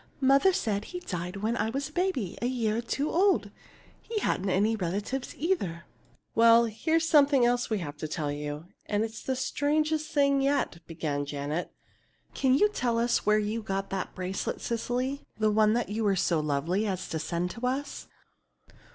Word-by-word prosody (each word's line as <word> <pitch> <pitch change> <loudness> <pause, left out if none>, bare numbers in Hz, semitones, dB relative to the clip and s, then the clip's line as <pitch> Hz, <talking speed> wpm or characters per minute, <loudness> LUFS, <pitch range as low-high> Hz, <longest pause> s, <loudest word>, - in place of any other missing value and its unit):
Mother 275 +7 +5
said 210 - -1
he 360 - -6
died 180 - -5
when 215 +4 -1
I 220 - 0
was 275 +4 -3
a - - -20
baby 350 - -1
a 240 - +1
year 230 -4 0
or - - 0
two 275 +6 -2
old. 385 +3 +2 0.5
He 455 - -5
hadn't 200 - 0
any 210 +4 +2
relatives, 205 +7 -3
either." 195 - -1 0.5
"Well, 230 +1 +6
here's 320 +9 0
something 285 -5 +5
else 245 0 +1
we 220 - +1
have 150 -6 -6
to 155 - -4
tell 150 -1 -2
you, 145 +2 -5 0.2
and 210 +1 +1
it's 225 0 -5
the 260 - -2
strangest 305 +3 0
thing 280 -2 +3
yet," 275 -10 0
began 150 -4 -3
Janet. 145 +4 -3 0.6
"Can 260 -1 +3
you 415 +10 +5
tell 245 - -1
us 235 -2 +1
where 210 0 +5
you 215 +2 -1
got 195 -2 -3
that 190 -1 -3
bracelet, 185 +1 -3
Cecily, 250 +4 -2 0.2
the 215 -1 +2
one 215 +2 +4
you 220 +2 -2
were 200 -2 +3
so 170 -2 +1
lovely 155 +8 0
as 185 -2 -3
to 160 - -2
send 170 +3 -2
to 245 +1 -3
us?" 275 +3 -3
225 Hz, 180 wpm, -28 LUFS, 185-275 Hz, 0.6 s, Well